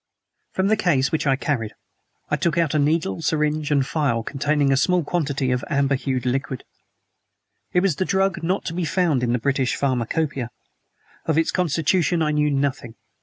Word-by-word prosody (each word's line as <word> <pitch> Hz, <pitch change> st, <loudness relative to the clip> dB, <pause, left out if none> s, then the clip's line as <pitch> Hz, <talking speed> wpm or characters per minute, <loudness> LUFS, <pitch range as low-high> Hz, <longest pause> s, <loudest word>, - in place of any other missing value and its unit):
From 190 Hz, -, 0 dB
the 215 Hz, +2 st, +4 dB
case 145 Hz, -10 st, +1 dB
which 155 Hz, -1 st, 0 dB
I 135 Hz, -, +4 dB
carried 130 Hz, -6 st, -2 dB, 0.6 s
I -, -, +4 dB
took 170 Hz, -1 st, 0 dB
out 165 Hz, -3 st, +2 dB
a 155 Hz, -, +2 dB
needle 160 Hz, +4 st, +1 dB
syringe 150 Hz, -1 st, 0 dB
and 145 Hz, -2 st, +3 dB
a -, -, -1 dB
phial 140 Hz, -6 st, 0 dB
containing 145 Hz, +2 st, +1 dB
a -, -, +3 dB
small 180 Hz, +5 st, +2 dB
quantity 140 Hz, -5 st, -1 dB
of 125 Hz, +1 st, -1 dB
amber 140 Hz, -1 st, +2 dB
hued 130 Hz, -2 st, -2 dB
liquid. 130 Hz, 0 st, -2 dB, 1.1 s
It 180 Hz, -, +3 dB
was 190 Hz, -4 st, 0 dB
a -, -, +3 dB
drug 190 Hz, -1 st, +1 dB
not 180 Hz, +4 st, -1 dB
to 165 Hz, -, -3 dB
be 180 Hz, +1 st, -2 dB
found 165 Hz, -5 st, +1 dB
in 120 Hz, -1 st, 0 dB
the 125 Hz, -, +2 dB
British 130 Hz, +1 st, 0 dB
Pharmacopoeia. 135 Hz, 0 st, -1 dB, 0.8 s
Of 160 Hz, -1 st, +1 dB
its 165 Hz, -, +2 dB
constitution 170 Hz, 0 st, +1 dB
I 150 Hz, -, +1 dB
knew 150 Hz, 0 st, +2 dB
nothing. 135 Hz, -5 st, -1 dB
150 Hz, 185 wpm, -23 LUFS, 135-165 Hz, 1.1 s, the